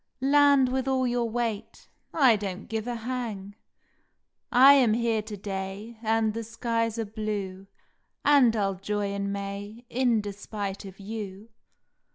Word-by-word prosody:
Land 280 -1 +5
with 260 +1 -1
all 260 -1 +1
your 240 -1 0
weight 230 -3 -4 0.2
I 265 -7 +5
don 200 -2 -4
t - - -13
give 225 0 -4
a 245 - -2
hang! 225 -4 -5 1.0
I 265 +3 +8
am 250 -6 +4
here 230 -2 +1
to 210 -1 -8
day 195 +3 -6
And 220 -1 +1
the 230 +1 -4
skies 230 0 -2
are 225 - -1
blue, 205 -3 -5 0.6
And 275 -6 +5
I 205 -2 +1
ll 195 - 0
joy 205 0 -2
in 200 0 -2
May 200 +3 -6
In 245 -2 +2
despite 205 -1 -5
of 190 0 -11
you. 205 0 -7
220 Hz, 155 wpm, -27 LUFS, 200-240 Hz, 1.0 s, I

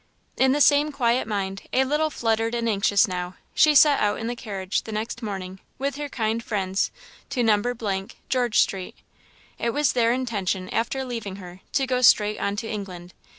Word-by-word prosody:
In 265 0 +3
the 290 +2 +1
same 290 +1 +5
quiet 240 -4 +1
mind, 195 -2 -3
a 260 - +3
little 300 +3 +1
fluttered 225 -3 0
and 235 -1 -1
anxious 205 -1 +3
now, 180 -1 -4 0.2
she 305 -1 +5
set 290 -1 +6
out 205 0 +1
in 225 - -4
the 240 +1 -2
carriage 195 -4 -3
the 220 - -9
next 220 +2 -4
morning 190 -3 -5 0.2
with 280 +1 -2
her 295 -1 -4
kind 225 -2 -1
friends 195 -3 -1 0.4
to 245 - 0
No., 210 -3 0 0.2
George 245 -4 +1
street. 190 -2 0 0.6
It 235 - 0
was 295 -2 +2
their 235 -2 +3
intention, 200 -7 -2
after 260 +4 -1
leaving 230 -6 -5
her, 180 -2 -11
to 270 - +2
go 255 -1 0
straight 210 -3 +5
on 200 0 -1
to 220 +2 -4
England. 185 -5 -7
225 Hz, 185 wpm, -24 LUFS, 195-255 Hz, 0.6 s, set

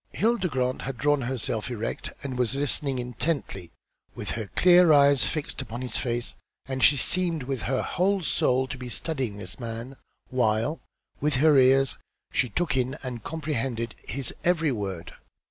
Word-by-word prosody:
Hilda 225 -3 +1
Grant 130 -4 -1
had 135 -1 -5
drawn 145 +1 +2
herself 120 -2 -2
erect, 115 -2 -4
and 135 -2 -4
was 125 0 0
listening 140 -1 -1
intently 125 - -3 0.5
with - - -1
her 110 -3 -4
clear 180 -2 +7
eyes 140 -2 +6
fixed 155 -3 -3
upon 120 +3 -6
his 125 - -5
face, 120 -1 -1 0.3
and 130 0 -3
she 145 - +7
seemed 170 +1 +1
with 130 -1 -3
her 130 - +1
whole 190 +1 +1
soul 130 -3 +2
to 130 - -6
be 125 -1 -6
studying 130 -7 -3
this 105 - -9
man, 115 +2 -6 0.4
while, 125 +4 +1 0.4
with 150 -1 +2
her 150 +3 +5
ears 135 0 +4 0.3
she 130 -5 +1
took 165 +4 0
in 130 +2 0
and 125 -4 -5
comprehended 135 -7 -3
his 135 -1 0
every 165 -4 +2
word. 95 -7 -4
130 Hz, 165 wpm, -26 LUFS, 120-150 Hz, 0.5 s, clear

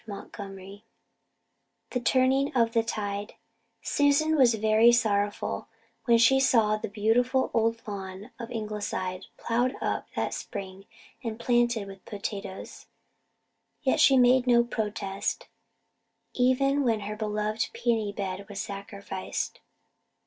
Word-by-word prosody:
CHAPTER 205 0 -7
XXX 195 +1 -11 1.1
THE 250 - 0
TURNING 260 +3 +2
OF 230 -2 +3
THE 230 - +4
TIDE 205 -2 -4 0.5
Susan 290 +2 +3
was 250 -6 +5
very 220 +2 +5
sorrowful 205 -3 0 0.4
when 235 -1 +5
she 235 +4 +5
saw 225 -5 +4
the 215 - -4
beautiful 240 +5 +1
old 230 0 0
lawn 195 +2 -7
of 235 -1 -6
Ingleside 210 -4 -4
ploughed 245 +3 0
up - - -2
that - - -1
spring 190 0 -7 0.4
and 225 -1 -4
planted 240 -3 +1
with 195 -1 -11
potatoes. 200 -2 -6 1.0
Yet 265 - +2
she 270 - +6
made 250 0 +5
no 235 -1 +5
protest, 210 -4 -3 0.9
even 275 +3 +2
when 225 -4 +1
her 210 +1 -5
beloved 215 +1 -2
peony 230 -3 0
bed 200 -1 -5
was 200 -1 -6
sacrificed. 200 -1 -5
220 Hz, 120 wpm, -27 LUFS, 200-245 Hz, 1.1 s, she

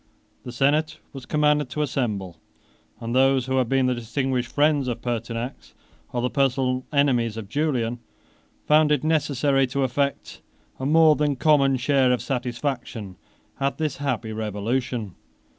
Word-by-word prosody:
The 125 - -6
senate 145 +5 +1 0.2
was 135 -3 -9
commanded 150 -2 +2
to 150 +4 -2
assemble; 105 -10 -3 0.6
and 115 0 -4
those 135 0 +3
who 130 0 -1
had 125 -3 +1
been 135 -1 +2
the 125 - +2
distinguished 125 +1 -2
friends 145 -2 +2
of 120 -1 -3
Pertinax, 115 - -4 0.4
or 120 -1 -2
the 125 - +1
personal 130 -2 0
enemies 125 -6 +1
of 110 -3 -6
Julian, 125 -3 -1 0.7
found 150 0 +4
it 150 -2 +2
necessary 140 -3 +1
to 135 +2 -1
affect 140 +2 -2 0.4
a 130 - -2
more 160 0 +5
than 145 -1 0
common 140 -1 +3
share 130 0 +2
of 125 - 0
satisfaction 120 -5 -4 0.4
at 135 0 -1
this 155 -3 -2
happy 125 -6 -3
revolution. 110 +1 -3
130 Hz, 145 wpm, -24 LUFS, 120-145 Hz, 0.7 s, more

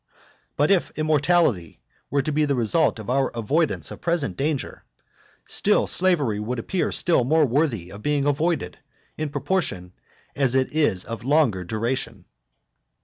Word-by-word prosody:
But 145 +6 +3
if 190 -3 +2
immortality 155 - +1 0.3
were 140 0 +1
to 155 - -2
be 150 +1 +2
the 140 -1 0
result 125 +7 +1
of 110 - -9
our 135 +2 +1
avoidance 145 +8 0
of - - -9
present 160 - -1
danger, 145 - -3 0.6
still - - +2
slavery 150 - +1
would 120 +4 -3
appear 165 +8 -1
still 170 -8 +2
more 155 +5 +3
worthy 120 - -1
of 100 - -10
being 145 +2 0
avoided, 145 - -1 0.4
in 155 -1 -3
proportion 100 - -2 0.4
as 135 -3 +1
it 130 +1 +1
is 145 - +1
of 115 0 -7
longer 130 -9 +2
duration. 115 +7 -3
140 Hz, 145 wpm, -23 LUFS, 115-155 Hz, 0.6 s, But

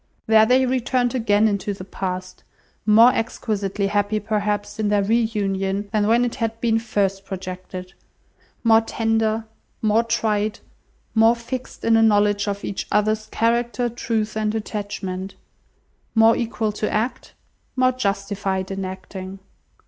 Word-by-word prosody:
There 220 0 +5
they 255 +2 +4
returned 250 -1 0
again 220 -3 +3
into 205 -1 -1
the 185 - -8
past, 185 -1 -5 0.4
more 225 +4 +7
exquisitely 205 -3 -2
happy, 205 +1 0
perhaps, 210 0 -2
in 210 -1 +1
their 205 -1 +2
re 225 +4 +3
union, 195 -1 -1
than 210 -1 +2
when 235 +2 +4
it 240 - -2
had 225 0 -1
been 225 -1 +2
first 200 -4 -1
projected; 185 -1 -7 0.7
more 225 -1 +6
tender, 225 0 0 0.3
more 220 +1 +2
tried, 215 -2 0 0.6
more 225 +1 +5
fixed 245 +2 -6
in 230 - +4
a - - +4
knowledge 205 -2 +3
of 200 0 -3
each 195 - -4
other's 215 +1 +1
character, 240 +1 0
truth, 220 -2 -2
and 215 0 -1
attachment; 200 -3 -4 0.8
more 225 0 +6
equal 225 -2 -1
to 210 +1 -3
act, 235 +4 -2 0.4
more 255 0 +3
justified 200 -4 -2
in 195 0 -3
acting. 185 0 -7
215 Hz, 140 wpm, -22 LUFS, 200-225 Hz, 0.8 s, more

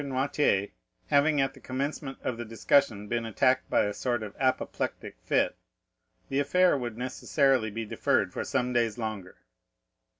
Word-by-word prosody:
Noirtier 135 -6 +1 0.4
having 145 +1 +4
at 135 0 +1
the - - -15
commencement 135 +1 -4
of 125 - -1
the 120 - -5
discussion 115 -1 +1
been 115 +1 -1
attacked 130 +4 +1
by - - +3
a 105 - -2
sort 120 +1 -1
of 105 -2 -8
apoplectic 130 -1 -1
fit, - - +1 0.7
the 135 - 0
affair 180 +6 +3
would 120 -4 -4
necessarily 130 -1 +1
be 115 +2 -4
deferred - - 0
for - - -3
some 125 0 -1
days 115 -3 +1
longer. 110 -5 -5
125 Hz, 155 wpm, -28 LUFS, 110-140 Hz, 0.7 s, having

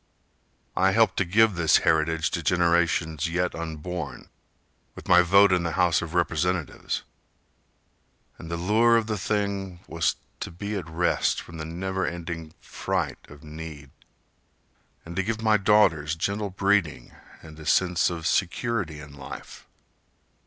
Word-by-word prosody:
I 95 +1 +3
helped 115 +1 +3
to 95 - +2
give 110 +4 +4
this 85 -3 +4
heritage 80 0 +2
To 85 - -2
generations 85 -2 +1
yet 90 +1 -1
unborn, 85 +2 -6 0.7
with - - -11
my 90 -1 +7
vote 100 +3 +5
In 90 - +2
the 85 -1 -2
House 85 -1 +2
of 85 0 -6
Representatives, 85 -1 -1 1.4
And 80 - -9
the 85 - -3
lure 110 +6 +4
of 115 - 0
the 105 -2 -3
thing 100 -3 -2
was 85 +1 0 0.2
to - - -5
be 100 +5 -5
at 90 -5 -5
rest 85 +2 +1
From 85 - -10
the 80 - -4
never—ending 85 -2 -4
fright 90 -7 -3
of 75 +1 -14
need, 75 -2 -9 1.1
And 85 +1 -8
to - - +3
give 110 +3 -3
my 110 -1 +4
daughters 95 -7 +3
gentle 100 +5 -2
breeding, 95 -9 0 0.3
And 80 -1 -12
a 80 - -10
sense 90 +5 +3
of 85 -2 -6
security 95 -2 -1
in 75 -1 -11
life. 70 - -10
85 Hz, 145 wpm, -26 LUFS, 80-95 Hz, 1.4 s, my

